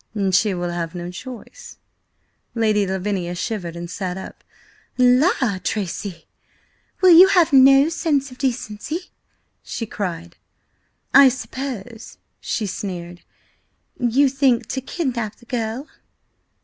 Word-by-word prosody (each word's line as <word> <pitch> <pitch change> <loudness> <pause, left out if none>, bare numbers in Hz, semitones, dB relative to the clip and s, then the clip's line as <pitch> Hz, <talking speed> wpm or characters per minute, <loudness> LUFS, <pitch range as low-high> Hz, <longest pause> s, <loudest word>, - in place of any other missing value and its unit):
"She 190 +1 +2
will 175 0 -3
have 170 0 -4
no 175 0 -5
choice." 255 - -10 0.8
Lady 215 -3 +2
Lavinia 190 -2 -2
shivered 175 -3 -4
and 170 0 -6
sat 185 0 -4
up. 190 - -10 0.5
"La, 250 - +3
Tracy! 195 -2 -4 0.8
Will 370 -1 +7
you 350 +3 +9
have 345 -5 +3
no 270 +2 +7
sense 290 -5 -1
of 250 - -14
decency?" 260 - -3 0.5
she 230 - -5
cried. 175 -5 -5 0.8
"I 275 -1 +9
suppose," 245 -3 -7 0.2
she 220 - -3
sneered, 175 -3 -6 0.8
"you 255 +3 +3
think 265 -3 +2
to 265 - -3
kidnap 245 - -3
the 240 - -21
girl?" 235 +3 -3
230 Hz, 115 wpm, -21 LUFS, 185-270 Hz, 0.8 s, you